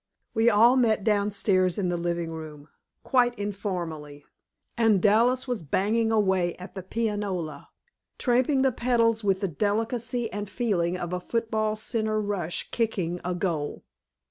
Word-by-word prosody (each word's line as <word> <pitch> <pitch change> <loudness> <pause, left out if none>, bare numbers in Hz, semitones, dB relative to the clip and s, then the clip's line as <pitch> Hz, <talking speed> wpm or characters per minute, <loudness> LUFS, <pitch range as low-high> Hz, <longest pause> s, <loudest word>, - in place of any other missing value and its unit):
We 225 +1 +4
all 235 +4 +5
met 220 -5 +2
downstairs 200 -3 +1
in 190 -3 0
the 175 - 0
living 170 -1 -2
room, 155 -2 -9 0.3
quite 245 -2 +2
informally, 175 -8 -5 0.5
and 225 -4 +3
Dallas 235 +7 +3
was 245 -5 -2
banging 215 +9 +1
away 190 -5 +2
at 180 +2 -10
the 190 - -6
pianola, 190 -7 -3 0.5
tramping 260 +2 +2
the 265 - +3
pedals 230 -2 +1
with 195 -2 +1
the 195 - +1
delicacy 225 - -1
and 205 0 -4
feeling 185 -7 0
of 175 -1 -4
a 180 - -1
football 220 +1 -1
center 215 0 -1
rush 200 -5 -3
kicking 185 -7 -1
a 180 0 -2
goal. 165 -5 -2
205 Hz, 145 wpm, -26 LUFS, 175-230 Hz, 0.5 s, all